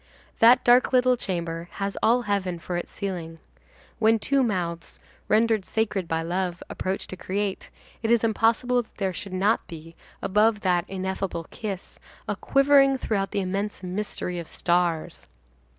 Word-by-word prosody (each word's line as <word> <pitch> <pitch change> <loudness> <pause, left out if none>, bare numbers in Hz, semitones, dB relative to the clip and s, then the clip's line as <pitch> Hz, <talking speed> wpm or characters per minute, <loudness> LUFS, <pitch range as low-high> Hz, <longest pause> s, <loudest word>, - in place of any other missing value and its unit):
That 240 +3 +7
dark 245 +2 +5
little 255 0 +4
chamber 170 -5 -4
has 200 0 -3
all 240 +2 +3
heaven 195 -4 -1
for 175 +1 -5
its 175 - -3
ceiling. 175 -5 -5 0.6
When 225 0 +4
two 275 +5 +1
mouths, 175 -8 -2 0.3
rendered 220 -1 +3
sacred 205 -4 -1
by 165 0 -1
love, 175 +1 -2
approach 190 +1 -3
to - - -7
create, 195 +2 -3 0.3
it 225 - -1
is 235 -1 +4
impossible 230 +3 +2
that 225 - -19
there 190 -2 -1
should 195 +2 -7
not 200 +4 +1
be, 165 -1 -10 0.2
above 210 +1 +2
that 180 -2 +1
ineffable 190 -2 -3
kiss, 200 -4 -6 0.3
a - - -1
quivering 275 -1 +4
throughout 195 -6 -1
the 200 - -1
immense 195 +2 -3
mystery 180 -1 -4
of 170 - -7
stars. 175 -2 -1
195 Hz, 150 wpm, -25 LUFS, 180-225 Hz, 0.6 s, That